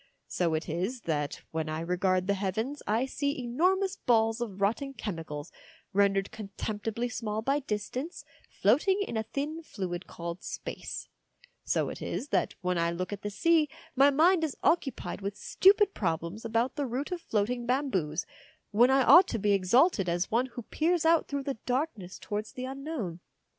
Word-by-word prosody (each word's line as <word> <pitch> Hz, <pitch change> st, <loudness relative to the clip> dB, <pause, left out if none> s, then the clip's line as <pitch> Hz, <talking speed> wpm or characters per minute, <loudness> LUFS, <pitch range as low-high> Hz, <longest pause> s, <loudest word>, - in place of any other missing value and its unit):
So 170 Hz, -3 st, 0 dB
it 155 Hz, -, -3 dB
is 185 Hz, +10 st, -2 dB
that 150 Hz, -5 st, -2 dB
when 160 Hz, -1 st, -2 dB
I 155 Hz, 0 st, -2 dB
regard 180 Hz, +2 st, +1 dB
the 200 Hz, -, +2 dB
heavens 220 Hz, +9 st, -2 dB
I 225 Hz, +5 st, +2 dB
see 285 Hz, +1 st, -2 dB
enormous 360 Hz, +11 st, +1 dB
balls 225 Hz, -1 st, +2 dB
of 205 Hz, -5 st, -4 dB
rotting 250 Hz, +8 st, 0 dB
chemicals, 160 Hz, -9 st, -5 dB, 0.4 s
rendered 195 Hz, 0 st, +2 dB
contemptibly 215 Hz, +2 st, -4 dB
small 220 Hz, -2 st, -3 dB
by 275 Hz, +4 st, +2 dB
distance, 255 Hz, -, -4 dB, 0.2 s
floating 385 Hz, +8 st, +3 dB
in -, -, -5 dB
a 220 Hz, -, +1 dB
thin 300 Hz, +4 st, -3 dB
fluid 185 Hz, -, -5 dB
called 170 Hz, +1 st, -6 dB
space; -, -, -6 dB, 0.6 s
so -, -, 0 dB
it -, -, -7 dB
is 285 Hz, -, -4 dB
that -, -, +1 dB
when 180 Hz, -1 st, 0 dB
I 170 Hz, 0 st, +2 dB
look 185 Hz, +3 st, -3 dB
at 200 Hz, -, -6 dB
the 205 Hz, -, -3 dB
sea 315 Hz, +7 st, +3 dB, 0.3 s
my 275 Hz, +2 st, +7 dB
mind 325 Hz, +5 st, +4 dB
is 310 Hz, -4 st, -2 dB
occupied 300 Hz, -10 st, 0 dB
with 200 Hz, +1 st, -4 dB
stupid 400 Hz, -, +4 dB
problems 170 Hz, +3 st, -2 dB
about 230 Hz, +5 st, 0 dB
the 285 Hz, -2 st, 0 dB
route, 260 Hz, +8 st, -3 dB
of 355 Hz, -1 st, -3 dB
floating 235 Hz, 0 st, -1 dB
bamboos, 200 Hz, -, 0 dB, 0.5 s
when 235 Hz, +4 st, +5 dB
I 265 Hz, 0 st, +5 dB
ought 355 Hz, +8 st, +8 dB
to -, -, -2 dB
be 205 Hz, -1 st, +1 dB
exalted 200 Hz, -, +3 dB
as 175 Hz, +1 st, -1 dB
one 240 Hz, +4 st, +2 dB
who 240 Hz, -1 st, -8 dB
peers 330 Hz, +7 st, 0 dB
out 330 Hz, 0 st, +4 dB
through 280 Hz, -1 st, -3 dB
the 270 Hz, -5 st, -4 dB
darkness 245 Hz, -, -2 dB
towards 210 Hz, 0 st, -4 dB
the 255 Hz, -, -5 dB
Un 270 Hz, +1 st, -6 dB
known. 225 Hz, -, -4 dB
225 Hz, 175 wpm, -29 LUFS, 190-280 Hz, 0.6 s, ought